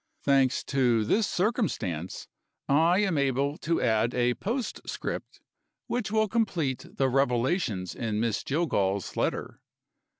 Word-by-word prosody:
Thanks 135 -1 +3
to 120 -5 +2
this 210 - +2
circumstance, 175 - -1 0.4
I 165 +7 +4
am 190 -7 +1
able 140 +1 +1
to 165 +1 0
add 115 0 +2
a 125 0 +2
postscript 225 - -4 0.4
which 240 -3 -2
will 220 0 +2
complete 190 - -1
the 135 - +3
revelations 125 - 0
in 110 -3 -2
Miss 115 -1 0
Jillgall's 100 - 0
letter. - - -2
135 Hz, 120 wpm, -28 LUFS, 115-180 Hz, 0.4 s, I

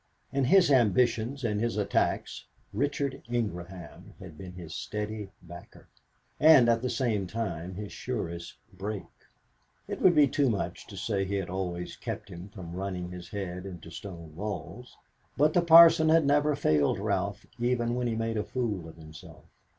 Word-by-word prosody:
In 135 -1 +1
his 175 +3 +5
ambitions 125 +1 +2
and 105 -2 0
his 115 -1 -1
attacks 100 -10 -1 0.3
Richard 140 +3 -1
Ingraham 95 -6 -5
had 90 -5 -11
been 90 +3 -9
his 85 -3 -9
steady 105 0 -4
backer, 85 0 -13 0.5
and 150 -6 +7
at 115 -1 +3
the 125 - -1
same 110 -8 0
time 90 -5 -4
his 105 +1 -6
surest 85 - -5 0.2
brake. 100 +2 -5 0.8
It - - -5
would 180 -2 +6
be 150 -2 +6
too 140 0 +1
much 105 -4 -3
to - - -10
say 100 - -1
that 95 - 0
he 100 - -1
had 95 -3 -3
always 90 -2 -4
kept 105 - -6
him 90 +1 -9
from 95 -5 -9
running 90 -1 -4
his 90 -1 -9
head 95 -3 -5
into 90 -3 -10
stone 85 -4 -9
walls, 95 -4 -6 0.4
but 150 +2 +4
the 175 - +4
Parson 165 -1 +8
had 160 -1 +5
never 145 +1 +3
failed 75 - +2
Ralph - - -2
even 120 -1 0
when 125 0 -1
he 115 - -1
made 115 0 -2
a 105 - 0
fool 105 -11 -3
of 80 - -14
himself. 80 -1 -13
105 Hz, 170 wpm, -29 LUFS, 90-125 Hz, 0.8 s, Parson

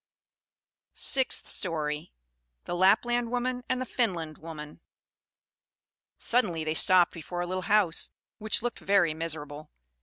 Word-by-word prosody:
SIXTH 265 -2 +3
STORY. 155 -4 -2 0.5
The - - -5
Lapland 230 +6 +2
Woman 250 +1 -2
and 255 - 0
the 255 - -3
Finland 175 - -2
Woman 150 -2 -10 1.4
Suddenly 185 -10 0
they 155 0 -2
stopped 180 +2 +5
before 175 +2 -6
a - - -2
little 185 +1 -4
house, 200 -6 +2 0.3
which 215 +1 -1
looked 240 - -3
very 195 -5 +2
miserable. 155 -2 -5
180 Hz, 120 wpm, -28 LUFS, 160-235 Hz, 1.4 s, stopped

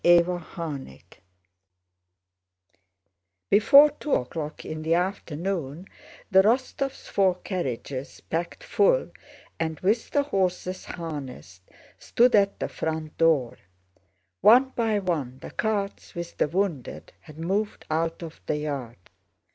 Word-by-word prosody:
CHAPTER 175 +1 +5
XVII 145 - -6 2.5
Before 280 +8 +8
two 295 0 -4
o'clock 150 +4 -4
in 155 0 -5
the 160 +1 +2
afternoon 175 -3 -3 0.5
the 190 0 +7
Rostóvs' 260 +5 0
four 190 -2 +2
carriages, 140 - -5
packed 170 +2 -4
full - - +2 0.5
and 160 -2 -2
with 215 +5 +1
the 285 - +2
horses 185 -6 -1
harnessed, 140 - -7 0.4
stood 245 +1 +3
at 200 -2 +3
the - - -1
front 155 -1 -4
door. 155 -7 +2 0.8
One 250 +5 +7
by 225 -4 0
one 155 -10 -2
the - - -9
carts 205 -2 -2
with 170 0 -6
the - - +2
wounded 170 -5 -3
had 155 -1 -14
moved 195 +6 -2
out 165 +2 -1
of 165 -1 -9
the 150 - 0
yard. 140 -6 -4
175 Hz, 115 wpm, -26 LUFS, 155-200 Hz, 2.5 s, Before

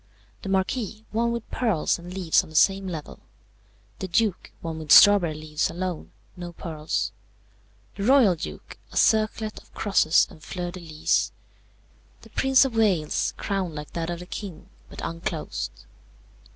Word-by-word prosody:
The 195 - -6
Marquis, 215 +3 -1
one 235 +2 +1
with 235 -1 -4
pearls 215 -9 +1
and 175 +1 -9
leaves 180 -3 +2
on - - -13
the 155 - -13
same 195 +3 +4
level. 160 -5 -6 0.8
The 190 - -3
Duke, 195 +1 0
one 160 -1 -5
with 155 -2 -5
strawberry 200 -6 +8
leaves 155 -1 -2
alone 180 -1 -4 0.2
no 175 -1 -7
pearls. 155 -2 -3 0.8
The - - -6
Royal 255 -6 +6
Duke, 170 +1 -8
a - - -6
circlet 215 0 +2
of - - -25
crosses 195 -6 +3
and 155 - -15
fleurs 175 0 -5
de 185 - -7
lys. 155 -3 0 0.9
The - - -15
Prince 265 0 +4
of 255 -4 -3
Wales, 190 -9 +1
crown 190 -5 -2
like 150 0 -7
that 165 0 -3
of 175 - -3
the 180 - -9
King, 180 -3 -8 0.2
but - - -9
unclosed. 155 - -5
180 Hz, 155 wpm, -25 LUFS, 160-210 Hz, 0.9 s, strawberry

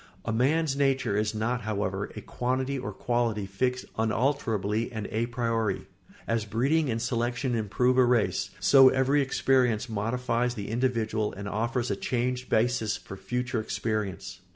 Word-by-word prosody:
] - - -28
A 115 - -1
man's 140 +5 +2
nature 135 -6 +1
is 105 +1 0
not, 120 +3 -1
however, 100 -2 -2
a - - -6
quantity 130 +2 -2
or 125 -5 -4
quality 115 -1 -1
fixed 125 +6 -1
unalterably 110 -2 0
and 110 -3 -4
a 115 +2 0
priori. 115 -4 -1 0.4
As 115 -1 0
breeding 135 +9 +1
and 115 -1 -1
selection 120 +2 -1
improve 125 +4 +1
a - - +7
race, 120 -3 +1
so 135 -2 +7
every 135 +3 +2
experience 130 -4 +2
modifies 120 +3 -1
the 100 -3 -5
individual 115 -3 0
and 100 +1 -6
offers 115 +4 -1
a - - +1
changed 125 +1 -2
basis 110 -2 +1
for 95 - -10
future 125 +3 -2
experience. 105 -5 -3
120 Hz, 155 wpm, -28 LUFS, 110-125 Hz, 0.4 s, a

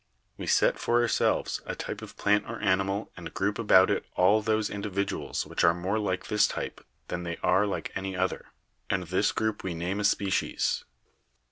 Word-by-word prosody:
We - - -7
set - - +3
for 120 0 +2
ourselves! 120 -1 +1
a - - -3
type - - -5
of - - -10
plant 105 +1 +2
or 115 - -5
animal 95 +1 0
and 85 -2 -8
group 100 +3 -1
about 95 -4 +6
it - - 0
all 100 +4 +4
those 110 -1 +1
individuals 100 -1 -2
which - - -2
are 85 - +5
more 95 +5 -1
like 95 -3 -2
this 105 -1 +3
type - - -5 0.3
than 90 - -3
they 85 -1 -4
are 95 +3 +3
like 100 - -3
any 95 -1 -4
other, 95 +1 -1 0.4
and 95 -1 0
this 95 +4 +1
group 110 -1 -2
we 90 -3 -3
name 90 +5 -2
a - - -1
species. 100 -1 +1
100 Hz, 190 wpm, -28 LUFS, 95-105 Hz, 0.4 s, about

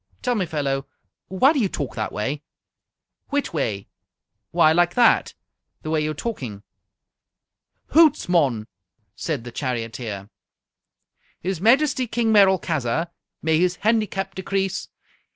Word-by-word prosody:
"Tell 250 - +1
me, 195 -6 -1
fellow, 140 -4 -2 0.4
why 255 - +4
do 290 - 0
you 205 -6 +1
talk 140 -6 -4
that 110 - -3
way?" 135 +8 -3 0.9
"Whitway?" 140 - -1 0.6
"Why, 155 - +4
like 175 +1 +2
that. 245 -1 +4 0.5
The 155 - -4
way 160 -1 +2
you're 155 0 -2
talking." 130 - -5 1.3
"Hoots, 310 -1 +5
mon!" 140 -11 +2 0.5
said 145 -4 -3
the 120 - -8
charioteer. 115 -5 -4 1.1
"His 180 -1 -3
Majesty 260 +3 +3
King 230 -1 +1
Merolchazzar 170 - +2 0.3
may 160 0 +2
his 180 0 +2
handicap 210 -4 +1
decrease! 190 0 -2
170 Hz, 115 wpm, -23 LUFS, 135-215 Hz, 1.3 s, Hoots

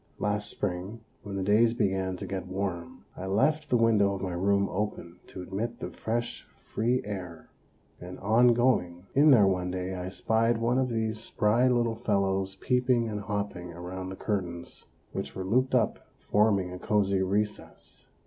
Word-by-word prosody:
Last 105 0 -1
spring, 95 +4 -4 0.2
when 100 -1 -7
the 95 - -2
days 110 +4 +4
began 95 -4 0
to - - -6
get 95 -1 -4
warm, 95 -2 -4
I 95 - -6
left 150 +10 +1
the 125 - +4
window 105 -4 +3
of 95 - -6
my 90 -2 -2
room 100 +2 +2
open 95 -3 -4
to 90 - -8
admit 110 +6 -4
the - - -5
fresh 115 +1 -3
free 120 +3 -1
air; 90 -5 -7 0.5
and 90 +1 -8
on 115 +4 +4
going 90 -8 +1
in 145 +3 +6
there 120 -8 +7
one 90 -2 0
day 90 +1 -3
I 90 0 -4
spied 115 +4 +1
one 120 +3 +1
of 130 -1 +1
these 110 -2 -1
spry 115 +2 +2
little 120 -2 +2
fellows 95 -3 0
peeping 125 +1 +1
and 105 -2 -4
hopping 100 -4 -4
around 90 +2 -6
the 95 - -6
curtains, 90 -5 -4 0.2
which - - -5
were 95 - -4
looped 130 +6 +2
up, 115 -3 +2 0.2
forming 100 -4 +1
a 90 - -7
cozy 100 -2 +1
recess. 105 +3 -3
100 Hz, 170 wpm, -28 LUFS, 95-115 Hz, 0.5 s, there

